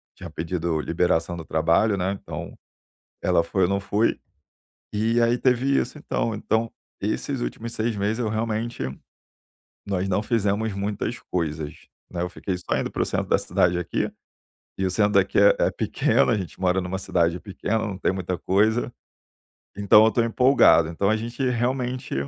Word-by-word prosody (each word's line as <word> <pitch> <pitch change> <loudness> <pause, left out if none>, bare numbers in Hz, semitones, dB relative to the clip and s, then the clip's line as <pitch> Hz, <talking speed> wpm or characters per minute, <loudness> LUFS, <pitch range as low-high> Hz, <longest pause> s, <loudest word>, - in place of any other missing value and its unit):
tinha - - -9
pedido 80 -1 -2
liberação 85 +2 0
do 80 - -8
trabalho, 85 +7 +2
né, 95 +1 -1
então, - - -8 0.7
ela 85 - +3
foi, 95 +3 -1
eu - - +2
não 100 0 0
fui. 100 +3 0 0.7
E 115 +3 +1
aí 115 +1 +3
teve 125 +1 +1
isso, 150 - -3
então 115 -5 -2
então, 110 +2 -1 0.3
esses - - -2
últimos 115 - -5
6 115 0 -1
meses 105 +3 -1
eu 110 - 0
realmente 110 - -2 1.0
nós 95 -1 -1
não 95 +2 +1
fizemos 110 -1 0
muitas 105 +4 -3
coisas, 75 -4 -3 0.2
né. 85 -1 -3
Eu 90 - -1
fiquei 90 +1 -4
só 90 - -2
indo - - -2
para - - -2
o - - +3
centro - - -2
da - - +3
cidade 90 0 +1
aqui, 90 -1 -2 0.7
e 95 - -2
o 95 - +1
centro 105 +2 +2
daqui 100 0 +2
é 100 - +6
é - - +2
pequeno, - - +1
a 110 - +3
gente 95 -2 -6
mora 95 0 +2
numa 95 +1 -3
cidade 85 -2 0
pequena, 105 +2 -2
não 105 -3 -3
tem 95 - +1
muita 95 -1 -3
coisa, 110 +7 +1 0.8
então 100 +1 +6
eu - - +4
tô 115 - +2
empolgado. 115 - +5
Então 100 +5 0
a 110 - +3
gente, 120 +4 -5
realmente, 125 - -2
100 Hz, 175 wpm, -24 LUFS, 90-115 Hz, 1.0 s, é